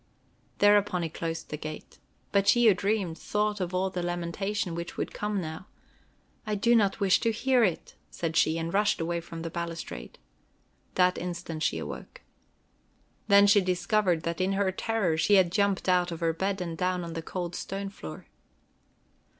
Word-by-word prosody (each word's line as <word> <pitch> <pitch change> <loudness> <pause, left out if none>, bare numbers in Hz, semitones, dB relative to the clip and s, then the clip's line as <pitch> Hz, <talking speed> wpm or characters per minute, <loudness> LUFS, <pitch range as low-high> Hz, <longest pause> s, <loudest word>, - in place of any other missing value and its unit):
Thereupon 205 -3 +4
he 165 - -2
closed 165 +1 -5
the 150 - -4
gate. 155 0 -8 0.3
But 200 -1 +2
she 240 +3 +5
who 215 - +8
dreamed 195 -4 -1
thought 210 -1 -1
of 180 -1 -2
all 190 +1 0
the 180 - -3
lamentation 175 +2 -2
which 170 +1 -6
would - - -3
come 210 -1 -2
now. 160 +1 -6 0.8
"I 215 -1 -2
do 235 +4 +3
not 205 -3 +2
wish 195 -2 +4
to 230 - +1
hear 250 +2 +2
it," 180 -6 -1 0.2
said 165 -1 -4
she, 160 +1 +3
and 165 0 -3
rushed 210 +1 +2
away 170 +1 -1
from 165 -1 -8
the 165 - -4
balustrade. 165 - -6 0.8
That 180 0 +3
instant 175 -2 -5
she - - +1
awoke. - - -7 1.1
Then 200 0 +7
she 205 0 +6
discovered 180 -1 +1
that 170 +2 -2
in 190 +1 +1
her 195 -1 +1
terror 190 -4 0
she 205 +5 +4
had 185 -3 +4
jumped 200 0 +1
out 180 -1 +3
of 165 - -5
her 165 -1 +1
bed 195 +3 -2
and 170 -2 -4
down 180 +1 -1
on 170 -1 -6
the 165 - -4
cold 175 +1 -5
stone 195 +2 -4
floor. 80 - -9
180 Hz, 180 wpm, -28 LUFS, 170-200 Hz, 1.1 s, who